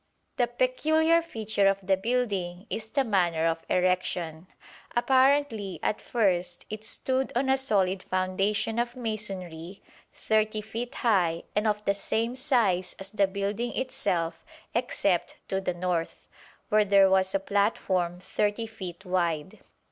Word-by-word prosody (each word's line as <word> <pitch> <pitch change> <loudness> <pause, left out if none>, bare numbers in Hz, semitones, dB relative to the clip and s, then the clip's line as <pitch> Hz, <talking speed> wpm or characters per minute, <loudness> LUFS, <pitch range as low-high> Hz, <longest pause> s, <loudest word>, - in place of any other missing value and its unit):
The 245 - +3
peculiar 315 +7 +2
feature 220 -9 0
of 195 0 +3
the 190 0 +4
building 195 -4 -2
is 220 0 -4
the 275 +2 +1
manner 175 -8 +1
of 165 0 0
erection. 180 -2 0 0.5
Apparently 260 -5 +2
at 215 - 0
first 180 -6 0
it 215 0 -6
stood 260 +4 0
on 265 +2 +1
a 265 - +4
solid 195 -7 +1
foundation 195 +5 0
of 240 +1 -1
masonry 195 -6 -4 0.3
30 215 0 0
feet 230 +3 -6
high 180 -8 +2
and 210 +1 +2
of 210 0 -1
the 200 - +3
same 225 +4 -1
size 235 -10 +1
as 195 0 -8
the 205 -2 +2
building 200 +5 -3
itself 175 -10 -1 0.3
except - - 0
to 190 0 0
the 180 -2 -2
north, 175 -2 -2 0.4
where 215 -1 +5
there 200 -1 +5
was 190 0 +2
a - - +3
platform 190 -3 0
30 210 +4 -1
feet 190 -4 -8
wide. 170 -4 -1
200 Hz, 140 wpm, -27 LUFS, 185-230 Hz, 0.5 s, where